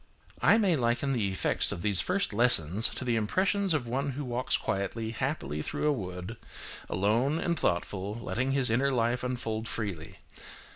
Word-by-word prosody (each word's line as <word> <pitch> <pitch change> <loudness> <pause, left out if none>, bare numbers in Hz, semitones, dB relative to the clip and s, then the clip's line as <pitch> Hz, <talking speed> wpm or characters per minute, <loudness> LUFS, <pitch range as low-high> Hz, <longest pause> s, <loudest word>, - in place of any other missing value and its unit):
I - - +6
may 195 -6 +3
liken 120 +1 +1
the 110 -6 +1
effects 95 - +1
of 85 - -5
these 100 -5 +4
first 195 - 0
lessons 105 -3 +3
to - - -5
the 120 -2 +1
impressions 185 - +1
of 135 -6 -1
one 135 +3 -1
who 145 +2 -4
walks 125 +1 0
quietly, 110 +3 -2
happily, 115 - -2
through - - -3
a 150 - +4
wood, 90 -1 -5 0.5
alone, 115 - +2
and 170 +1 0
thoughtful, 100 - -1
letting 130 +3 -1
his 135 -4 +2
inner 135 +4 +2
life 120 0 +1
unfold 115 -3 -2
freely. 100 -10 -5
120 Hz, 165 wpm, -29 LUFS, 105-135 Hz, 0.5 s, I